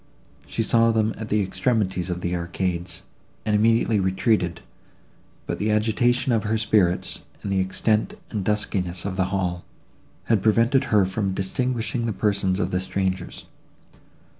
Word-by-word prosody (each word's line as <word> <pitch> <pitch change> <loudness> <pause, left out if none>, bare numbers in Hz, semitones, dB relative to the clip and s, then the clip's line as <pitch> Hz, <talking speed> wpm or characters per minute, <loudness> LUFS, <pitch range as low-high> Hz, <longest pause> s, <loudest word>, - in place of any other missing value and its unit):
She 115 - -1
saw 115 +1 +4
them 110 0 +1
at 110 -1 -7
the 105 -1 +2
extremities 95 -3 0
of 90 0 -3
the 90 0 -1
arcades, 85 0 -3 0.4
and 105 - +2
immediately 115 0 +3
retreated; 95 -2 +1 0.8
but - - -4
the 105 - 0
agitation 120 +4 +2
of 115 -3 +2
her 110 +1 0
spirits, 105 -5 +1 0.2
and 100 - -3
the 95 - +2
extent 110 - 0 0.2
and 105 -4 -2
duskiness 95 -4 -1
of 100 -2 -3
the 95 -1 +1
hall, 90 -2 -2 0.6
had 110 -4 +2
prevented 115 +6 +3
her 105 -6 +3
from 95 0 -2
distinguishing 120 +3 -1
the 110 - -1
persons 100 -1 +1
of - - -1
the 90 - +1
strangers. 95 -1 -3
105 Hz, 150 wpm, -24 LUFS, 95-110 Hz, 0.8 s, saw